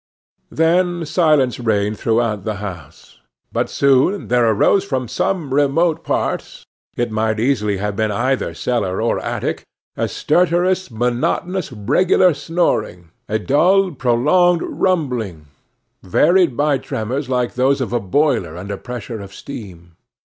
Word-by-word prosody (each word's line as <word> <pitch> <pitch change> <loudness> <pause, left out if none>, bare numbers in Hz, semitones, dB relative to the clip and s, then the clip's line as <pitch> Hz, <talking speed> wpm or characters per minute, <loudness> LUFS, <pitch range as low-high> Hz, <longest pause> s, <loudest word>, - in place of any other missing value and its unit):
Then 175 +1 +1
silence 150 -7 +2
reigned 105 -2 0
throughout 115 -3 0
the 110 0 -3
house. 95 -8 -9 0.3
But - - -1
soon 140 +9 +2
there 120 -1 +3
arose 150 - +3
from 130 -9 -3
some 160 - -2
remote 155 +4 +2
part - - -3 0.3
it 120 -1 -1
might 110 0 0
easily 110 -5 +1
have 105 +1 -3
been 110 +1 0
either 130 +5 -1
cellar 95 -7 -1
or 115 +1 0
attic - - -3 0.3
a - - -1
stertorous, 180 +2 +1
monotonous, 125 +10 -1
regular 170 - +3
snoring, 140 - -2 0.2
a 110 - +1
dull, 180 - +3
prolonged 150 +7 +2
rumbling, 125 - -1 0.6
varied 170 - +3
by 145 -2 +2
tremors 125 +6 -4
like 125 -2 0
those 135 +2 +2
of 125 -2 -3
a 120 - +2
boiler 110 - 0
under 100 +2 -5
pressure 120 -1 -7
of 100 -1 -10
steam. 90 -8 -10
125 Hz, 130 wpm, -19 LUFS, 110-165 Hz, 0.6 s, there